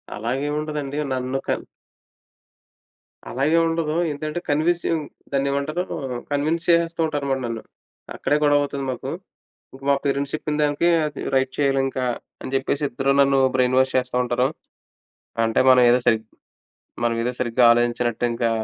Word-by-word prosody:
అలాగేవుండదండి. 145 +5 -3 0.2
నన్ను 130 +1 -2
కన్ - - -1 1.6
అలాగేవుండదు. 165 +3 +1 0.2
ఏందంటే, 155 +3 -4
కన్వీసింగ్ 160 +1 +1 0.3
దాన్నేమంటారూ? 140 +5 0 0.5
కన్విన్స్ 155 +4 0
చేసేస్తూ 170 -1 +3
ఉంటారు 145 -2 -3
మరి 135 - 0
నన్ను. 115 -1 -4 0.5
అక్కడే 150 - +1
గొడవవుతుంది 145 -1 +1
మాకు. 125 - -5 0.6
ఇంక 135 - -13
మా - - +6
పేరెంట్స్ 140 0 -1
చెప్పిన 150 -1 -2
దానికీ, 145 +3 +2 0.2
అది 145 -2 -6
"రైట్ 130 0 +1
చెయ్యాలింకా" 135 -2 +1 0.4
అని 130 - -6
చెప్పేసి 140 +2 -1
ఇద్దరూ 135 +3 +1
నన్ను 140 0 +4 0.2
బ్రెయిన్ 130 0 +2
వాష్ 130 0 +2
చేస్తా 125 -1 -3
ఉంటారు. 125 +1 +1 1.0
అంటే, 115 - +1
మనవేదో 125 -1 +6
సరి 115 -2 +4 0.9
మనవేదో 115 +1 0
సరిగ్గా 120 0 +2
ఆలోచించనట్టింకా 120 0 0
135 Hz, 120 wpm, -22 LUFS, 125-150 Hz, 1.6 s, మా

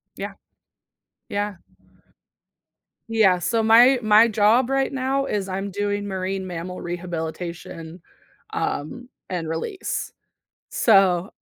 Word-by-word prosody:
Yeah. - - -6 1.0
Yeah. 205 -1 -2 1.5
Yeah, 200 -5 +4
so 225 +5 0
my 240 +4 +6
my 215 +1 +6
job 220 +4 +3
right 270 0 +1
now 270 +1 -1
is 200 -5 -2
I'm 195 +1 -3
doing 205 +1 -2
marine 190 0 -3
mammal 180 +1 -6
rehabilitation, 170 -1 -6 0.5
um, 245 - -4 0.2
and 170 -3 -3
release, 165 - -4 0.6
so 195 -3 +3
200 Hz, 100 wpm, -23 LUFS, 180-225 Hz, 1.5 s, my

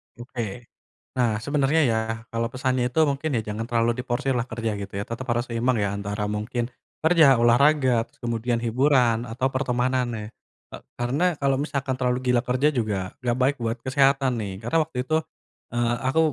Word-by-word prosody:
Oke. 120 -2 -6 0.5
Nah, 120 -3 +3
sebenarnya 145 +2 +2
ya, 110 - +1 0.3
kalau 115 0 -1
pesannya 130 -1 0
itu 140 - -1
mungkin 140 +3 -2
ya - - 0
jangan 110 +2 -3
terlalu 115 0 +2
diforsirlah 125 0 -1
kerja 115 -1 -2
gitu 100 0 -7
ya - - -2
tetap 115 +3 -5
harus 120 +1 0
seimbang 120 +1 +1
ya 100 - 0
antara 105 +1 -3
mungkin, 115 +3 -2 0.3
kerja, 160 -5 +6
olahraga 125 0 +4
terus - - -32
kemudian 120 0 -1
hiburan 120 -1 +2
atau 125 +4 -1
pertemanan 130 -1 +1
nih, 105 -2 -5 0.5
eee, - - -8 0.2
karena 130 +8 0 0.2
kalau 135 -1 +2
misalkan 140 -3 -2
terlalu 125 -1 +1
gila 120 - +3
kerja 130 +4 +2
juga 110 -5 0 0.2
enggak 120 0 0
baik 135 +3 +3
buat 115 +1 -1
kesehatan 135 0 +3
nih 100 -2 -4
karena 120 +8 +1
waktu 145 - -11
itu, 155 - +1 0.6
eee, 120 0 +1
aku 155 +5 +2
125 Hz, 175 wpm, -24 LUFS, 115-135 Hz, 0.6 s, kerja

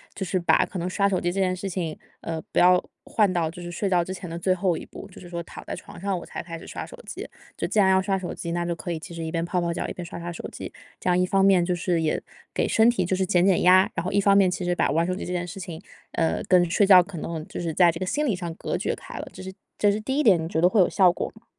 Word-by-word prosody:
就 195 - -4
是 185 0 0
把 175 - +3
可 190 - -8
能 175 - -2
刷 200 +1 +1
手 185 - +1
机 175 - -1
这 195 - -2
件 185 -1 +2
事 190 +2 -5
情， 170 -4 -3 0.2
呃， 165 -1 -4
不 - - +3
要 180 0 +6 0.2
换 210 -4 +2
到 170 -3 0
就 175 +1 -10
是 175 - -6
睡 195 +3 -2
觉 175 -2 +3
之 185 - -5
前 180 -2 -8
的 170 - -5
最 185 +2 +2
后 180 -2 0
1 - - -8
步， 200 - -11
就 - - -12
是 180 - -11
说 170 -1 -4
躺 - - -10
在 - - -4
床 - - -11
上 195 0 -1
我 - - -10
才 - - -6
开 170 -1 -7
始 - - -12
刷 - - -6
手 - - -11
机。 - - -6 0.3
就 - - -2
既 215 - +1
然 190 -2 +5
要 190 0 +5
刷 195 0 0
手 185 - -5
机， 170 - -5
那 175 0 -1
就 170 0 -2
可 175 - -5
以 165 - -3
其 175 +3 -10
实 165 - -5
一 160 - -4
边 165 -1 -1
泡 180 +1 -1
泡 170 -1 -1
脚、 - - -3
一 - - -5
边 180 - -7
刷 170 - -8
刷 175 0 -5
手 165 - -7
机。 - - -7 0.3
这 - - -1
样 180 0 +3
一 180 - +3
方 195 +1 +2
面 190 -3 +5
就 180 - 0
是 175 -1 0
也 155 - 0 0.3
给 - - +1
身 225 +1 +4
体 190 -6 0
就 185 - 0
是 190 0 0
减 180 -2 +3
减 195 -2 +3
压， 185 +1 +6
然 170 0 -2
后 - - -1
一 200 - +2
方 200 0 +5
面 190 -2 +5
其 180 - -3
实 175 0 +1
把 - - +1
玩 165 +3 +2
手 185 - 0
机 - - -5
这 180 - -4
件 180 0 -1
事 185 +3 -8
情， 175 -2 -7 0.3
呃， 165 -1 0
跟 175 -2 +4
睡 200 +4 +3
觉 190 -2 +8
可 180 -1 -8
能 160 0 -5
就 - - -7
是 165 -2 -2
在 175 0 +5
这 165 - -7
个 185 - -2
心 295 +10 0
理 230 -9 +1
上 175 -2 -5
隔 - - -3
绝 - - -2
开 - - -10
了。 - - -6
这 - - -10
是 190 0 -7 0.3
这 205 - +4
是 210 - -1
第 265 +6 -2
一 300 - +3
点， 190 -8 +5
你 - - -3
觉 160 -1 -1
得 180 - +5
会 215 +1 +2
有 180 - +6
效 185 -3 +4
果 - - -3
吗？ 220 - -19
180 Hz, 360 characters per minute, -25 LUFS, 170-190 Hz, 0.3 s, 觉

